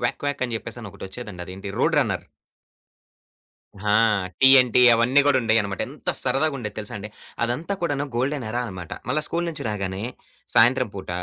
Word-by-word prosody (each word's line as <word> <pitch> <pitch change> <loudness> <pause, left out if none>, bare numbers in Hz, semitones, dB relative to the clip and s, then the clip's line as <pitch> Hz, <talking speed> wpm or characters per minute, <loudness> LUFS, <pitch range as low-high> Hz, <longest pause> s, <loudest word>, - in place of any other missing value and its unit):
Quack - - -1
quack 145 -2 -2
అని 120 - -5
చెప్పేససి 115 +2 -8
అనొకటొచ్చేదండి. 100 -1 -8
అదేంటి? 95 +2 -8
Road - - +2
runner. - - 0 1.7
ఆ! - - +4 0.5
టీ 135 - +8
ఎన్ 125 -1 0
టీ 125 - +6
అవన్నీ 125 +5 +4
గూడా 135 -2 +4
ఉండేవన్నమాట. 110 -4 +1
ఎంత - - -3
సరదాగ 155 +2 +1
ఉండేది 105 -4 -6
తెలుసా 105 - -6
అండి. 105 - -7 0.4
అదంతా 150 +12 -2
కూడాను 145 -3 0
గోల్డెన్ 130 -1 -1
ఎరా 120 +2 -1
అన్నమాట. 90 -5 -8 0.2
మల్ల 155 +3 +1
స్కూలు 170 +1 -1
నుంచి 155 - -6
రాగానే, 95 -1 -3 0.5
సాయంత్రం 125 0 +4
పూట 95 - -8
120 Hz, 165 wpm, -23 LUFS, 100-135 Hz, 1.7 s, టీ